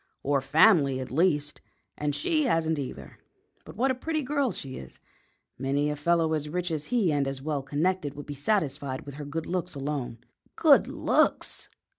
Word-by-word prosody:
"Or 140 0 +1
family, 145 -2 +4
at 130 - -6
least; 150 -1 +1 0.3
and 145 -1 -2
she 305 - +1
hasn't 160 - +1
either. 135 - -7 0.5
But - - -11
what 260 +4 +2
a - - +1
pretty 310 +4 -2
girl 280 -2 0
she 135 -7 -6
is! 65 - -10 0.6
Many 140 +3 0
a - - -2
fellow 160 +1 +1
as 150 -1 -2
rich 180 +2 -2
as 155 -2 -2
he 225 -9 +2
and 140 -2 +1
as 135 -1 -3
well 145 0 -2
connected 150 +2 -1
would 145 - -8
be 145 - -6
satisfied 140 -4 -1
with 140 - -8
her 145 +1 -7
good 160 +3 -4
looks 180 -2 -3
alone." 140 -4 -3 0.4
"Good - - +5
looks!" - - +1
150 Hz, 180 wpm, -27 LUFS, 140-180 Hz, 0.6 s, Good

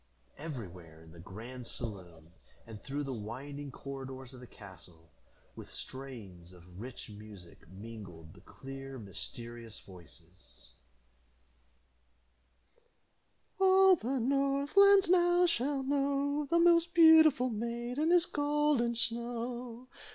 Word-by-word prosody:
Everywhere 90 - -9
in 80 - -16
the 85 - -14
grand 115 +8 -9
saloon, 90 -8 -7 0.3
and 110 -2 -11
through 145 +2 -4
the 135 -2 -4
winding 135 +6 -7
corridors 130 -1 -8
of 130 - -12
the 125 - -12
castle, 90 -6 -15 0.4
with - - -10
strains 105 -10 -9
of 90 +1 -15
rich 125 +1 -8
music 105 -6 -13
mingled 95 -5 -11
the 90 - -17
clear 135 +5 -9
mysterious 115 - -8
voices: 85 -8 -15 2.9
"All 380 0 +6
the 260 -2 -2
north 275 +4 0
land 400 -1 +7
now 350 0 +4
shall 280 -4 0
know, 285 +1 0
The 340 - +3
most 340 0 +4
beautiful 315 -6 +6
maiden 240 +7 -2
is 350 -1 +5
Golden 290 -6 +1
Snow. 235 +1 -3
135 Hz, 110 wpm, -32 LUFS, -, 2.9 s, land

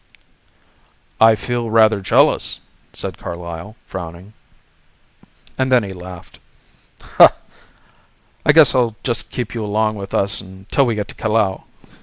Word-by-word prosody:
"I 110 0 +6
feel 120 +2 -3
rather 110 -2 +4
jealous," 95 - +2 0.3
said - - -7
Carlyle, 85 +4 -7
frowning 90 +2 -9 1.3
and 130 0 0
then 125 -3 +4
he 100 -1 -6
laughed. 90 -1 -11 0.8
"I - - 0
guess 155 -1 +6
I'll 120 -4 +1
just 120 -3 -1
keep 120 -3 -5
you 115 -2 -4
along 110 +1 -1
with 100 -1 -6
us 100 +2 +2
until 95 +7 -2
we 115 - 0
get 105 -1 -3
to - - -9
Callao. 110 -3 -1
105 Hz, 125 wpm, -19 LUFS, 95-115 Hz, 1.3 s, I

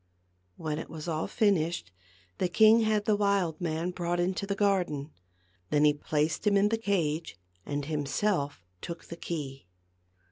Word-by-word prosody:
When 155 -1 -3
it - - -7
was 160 0 -7
all 160 -1 -1
finished 170 - +1 0.5
the 185 - +2
king 220 +5 +6
had 215 -2 +1
the 215 - +3
wild 200 -6 +1
man 165 +1 -1
brought 175 -1 -2
into 185 +3 -1
the 200 - -1
garden. 180 -8 0 0.6
Then 150 0 +3
he 150 - +6
placed 150 +5 -1
him 200 -1 +5
in 200 +1 +4
the 225 - +1
cage 170 - -1 0.3
and 145 -1 -2
himself 145 - -1 0.2
took 170 -1 -7
the 170 - -8
key. 140 - -5
170 Hz, 155 wpm, -29 LUFS, 150-200 Hz, 0.6 s, king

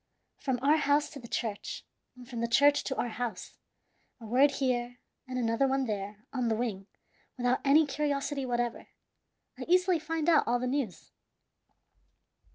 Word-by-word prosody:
From 260 -3 -1
our 295 +3 +5
house 290 0 +2
to 285 - -9
the 235 - -10
church, 220 -3 -4 0.3
and 250 -1 -13
from 235 -2 -5
the 235 - 0
church 285 +5 +4
to 265 - -2
our 245 - -1
house 225 -5 -5 0.6
a 230 - -11
word 265 +6 +4
here 245 -2 -1 0.3
and 255 0 -4
another 235 +2 +1
one 270 0 +1
there 205 -1 -5
on 250 -3 0
the 225 - +1
wing 210 -4 -3 0.5
without 245 0 +1
any 295 +3 +5
curiosity 285 0 -2
whatever 240 -2 -2 0.7
I - - -5
easily 360 0 +3
find 320 0 -3
out 325 -3 +4
all 245 - +2
the 250 - -3
news. 250 - -3
255 Hz, 165 wpm, -30 LUFS, 235-285 Hz, 0.7 s, our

